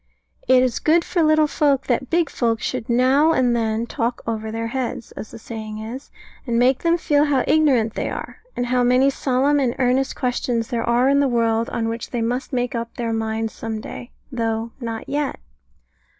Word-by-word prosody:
It 255 0 +6
is 250 -3 0
good 335 +2 +3
for 350 - 0
little 310 -1 +4
folk 285 -2 +1
that 255 +1 -1
big 335 -1 +2
folk 230 -2 0
should 220 - -4
now 265 +6 +4
and 250 -4 +2
then 225 0 0
"talk 240 0 -3
over 220 -1 -3
their 225 +1 -3
heads," 245 -2 -4
as 215 - -8
the - - -10
saying 220 -1 -7
is, 230 +6 -7 0.4
and 235 -1 0
make 250 +2 +3
them 335 0 +2
feel 295 -3 +2
how 275 -4 +2
ignorant 260 -8 +3
they - - -2
are, - - -6 0.2
and 245 - -1
how 250 0 +1
many 250 +3 +4
solemn 275 +2 +1
and 250 -3 0
earnest 260 +1 +1
questions 245 -2 -1
there 235 -3 -1
are 240 +2 +3
in 280 +1 +4
the 285 - +3
world 230 -2 +1
on 225 -1 -2
which 230 0 -4
they 240 - -2
must 245 +3 -2
make 245 -2 -1
up 230 -1 -4
their 230 -1 -2
minds 220 0 -2
some 220 -1 -5
day, 240 +3 -8 0.2
though 225 -1 -2
not 230 -3 -5
yet. 285 0 -2
245 Hz, 200 wpm, -21 LUFS, 230-270 Hz, 0.4 s, It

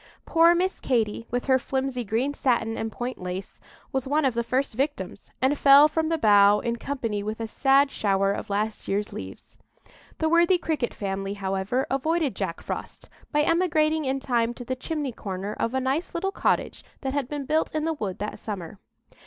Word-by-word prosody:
Poor 335 +1 +5
Miss 370 +2 0
Katy, 230 -3 0
with 245 0 -2
her 260 -1 +4
flimsy 265 -1 -2
green 235 +7 -1
satin 235 -5 0
and 225 0 -3
point 245 0 -5
lace, 180 +1 -6 0.3
was 265 0 -2
one 295 +2 +2
of 260 - +2
the 235 - 0
first 255 +3 -1
victims, 245 -7 -3
and 270 +3 +3
fell 280 +1 +8
from 320 +1 -1
the 330 - +1
bough 205 -5 +6
in 235 +2 -2
company 230 -6 -3
with 215 +2 -4
a 225 - -2
sad 275 +4 +3
shower 195 -1 +1
of 200 - -4
last 210 +2 -2
year's 205 +1 -1
leaves. 95 0 -9 0.6
The 320 - 0
worthy 340 +3 +4
Cricket 310 -8 -2
family, 195 0 -3
however, 195 +6 -1
avoided 310 +2 0
Jack - - -3
Frost - - -6 0.2
by 295 0 +3
emigrating 315 -2 +2
in 270 +1 0
time 240 -2 0
to 245 - -8
the 255 - -2
chimney 290 +1 -3
corner 195 -2 -5
of 230 +3 -2
a - - +2
nice 275 +8 -2
little 385 +3 -1
cottage - - 0 0.2
that 265 0 -2
had 280 -3 -1
been 290 -2 -4
built 310 +3 +1
in 310 0 -1
the 325 - +1
wood 205 - -4
that 210 +1 -5
summer. 195 -3 -6
255 Hz, 195 wpm, -26 LUFS, 210-295 Hz, 0.6 s, fell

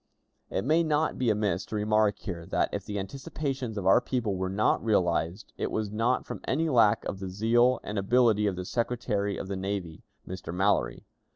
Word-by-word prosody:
It 95 - -2
may 160 +4 +4
not 155 -1 0
be 125 -2 +2
amiss 105 -4 0
to - - -5
remark 105 0 +2
here 85 -5 -6
that, - - +1
if - - -3
the 105 - -5
anticipations 130 +3 -4
of 100 - -3
our 95 +5 +6
people 120 -5 -1
were 95 0 -2
not 100 +3 +1
realized, 90 -2 0
it - - -1
was 110 -2 -2
not 115 +4 +1
from - - -7
any 160 +4 +1
lack 115 -6 +4
of 95 - -4
the 95 -1 -5
zeal 120 +6 +3
and 105 -1 -3
ability 110 0 +3
of 100 - -1
the 90 0 -5
Secretary 105 -3 -1
of - - -5
the 100 - -3
Navy, 95 -4 -4 0.3
Mr. 95 -2 -6
Mallory. 95 +4 0
105 Hz, 195 wpm, -28 LUFS, 95-120 Hz, 0.3 s, our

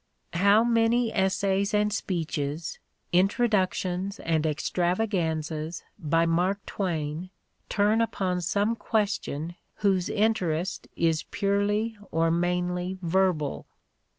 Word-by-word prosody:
How 200 +5 +5
many 230 0 +2
essays 195 +1 +1
and 210 0 +2
speeches, 160 -6 -3 0.3
introductions 190 -1 +1
and 160 -1 +1
extravaganzas 165 -2 -1 0.2
by 165 -1 +2
Mark 180 +4 +1
Twain 165 -2 -3 0.4
turn 210 +2 +3
upon 185 -5 -1
some 205 +6 +1
question 200 -8 -1 0.3
whose 190 -2 +2
interest 190 -5 0
is 165 -1 +2
purely 205 +2 0
or 165 +1 +2
mainly 180 +2 0
verbal! 170 -4 +1
185 Hz, 95 wpm, -27 LUFS, 165-205 Hz, 0.4 s, How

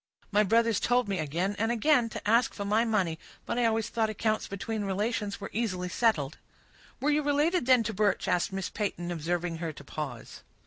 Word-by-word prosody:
My 205 0 +4
brothers 230 +1 +3
told 245 -1 +2
me, 195 -2 -1
again 170 +7 -1
and 225 +2 +1
again, 240 0 +3
to 215 - -6
ask 230 +3 +3
for 200 - -4
my 215 +3 +3
money; 190 -8 0 0.3
but 240 - -1
I 240 - +3
always 225 -1 +1
thought 225 -2 0
accounts 215 0 -1
between 210 +2 -4
relations 205 +1 -2
were 200 - -7
easily 185 -5 -1
settled." 170 - +1 0.6
"Were 290 +3 +1
you 300 +1 +3
related, 295 +1 +1
then, 255 -3 +6
to 220 - -3
Birch?" 205 -1 +1
asked 175 - +1
Miss 195 -1 -3
Peyton, 175 -4 -3
observing 170 +1 -2
her 165 -1 -3
to 140 - -12
pause. 140 -5 -7
210 Hz, 195 wpm, -29 LUFS, 180-230 Hz, 0.6 s, then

